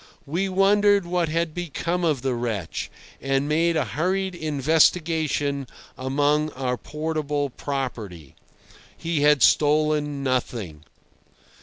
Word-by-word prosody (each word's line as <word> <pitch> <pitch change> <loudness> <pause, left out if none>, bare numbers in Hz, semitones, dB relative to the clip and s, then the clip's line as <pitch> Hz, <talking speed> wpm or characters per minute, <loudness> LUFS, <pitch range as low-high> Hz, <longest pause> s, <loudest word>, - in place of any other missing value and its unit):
We 175 +7 -1
wondered 200 +1 +4
what 175 -2 0
had 165 0 -1
become 175 +1 -3
of 150 -7 0
the 135 -1 0
wretch, 115 -8 -3 0.3
and 135 +1 0
made 165 +2 +2
a 150 - +1
hurried 185 - -1
investigation 155 -2 +1 0.3
amongst 145 +3 0
our 125 -2 -1
portable 150 -1 -3
property. 115 - -5 0.6
He 165 -3 -2
had 150 -4 +4
stolen 150 -1 +2
nothing. 115 - -2
150 Hz, 110 wpm, -24 LUFS, 135-165 Hz, 0.6 s, wondered